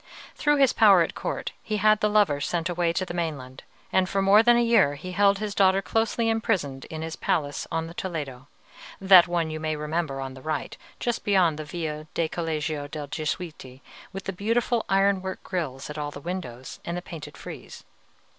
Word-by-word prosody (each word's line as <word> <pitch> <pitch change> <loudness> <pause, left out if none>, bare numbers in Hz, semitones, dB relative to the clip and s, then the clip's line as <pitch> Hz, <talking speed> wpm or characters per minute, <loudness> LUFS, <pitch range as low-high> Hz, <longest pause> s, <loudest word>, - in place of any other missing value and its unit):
Through 295 -1 +2
his 270 -2 +4
power 195 -6 +6
at - - -4
court - - -4
he 215 - -2
had 215 +1 +4
the 210 - +2
lover 205 -9 +3
sent 170 +3 -1
away 175 -1 +1
to 185 +2 -1
the 175 - -6
mainland, 145 -7 -4 0.3
and 185 -1 +3
for 195 - 0
more 195 +2 +6
than 240 +1 +5
a 240 - +3
year 230 -12 +4
he 185 +6 -7
held 200 +1 +3
his 210 0 -4
daughter 195 -1 +4
closely 225 +3 0
imprisoned 195 - -1
in 160 0 -6
his 160 0 -5
palace 145 -3 -1
on 165 0 -1
the 165 - -9
Toledo, 145 -8 -5 0.5
that 190 -2 +7
one, 170 -2 -1
you 155 - -4
may 155 0 -2
remember, 150 -2 -2
on 135 -1 -5
the 130 - -12
right, 155 +3 -3 0.2
just 240 -1 -2
beyond 180 -6 +3
the 155 - -5
Via 155 -1 -5
del 165 -1 0
Collegio 155 -3 -3
dei 150 0 -6
Gesuiti, 155 -3 -5 0.3
with 195 -1 -7
the 195 - -4
beautiful 230 +4 0
iron 195 0 +3
work 190 0 -6
grilles 150 -8 -4
at 150 0 -6
all 145 -1 -3
the 145 - -9
windows, 145 -7 -6
and 170 +1 -4
the 175 - -6
painted 165 -4 -9
frieze. - - -10
170 Hz, 200 wpm, -26 LUFS, 150-200 Hz, 0.5 s, that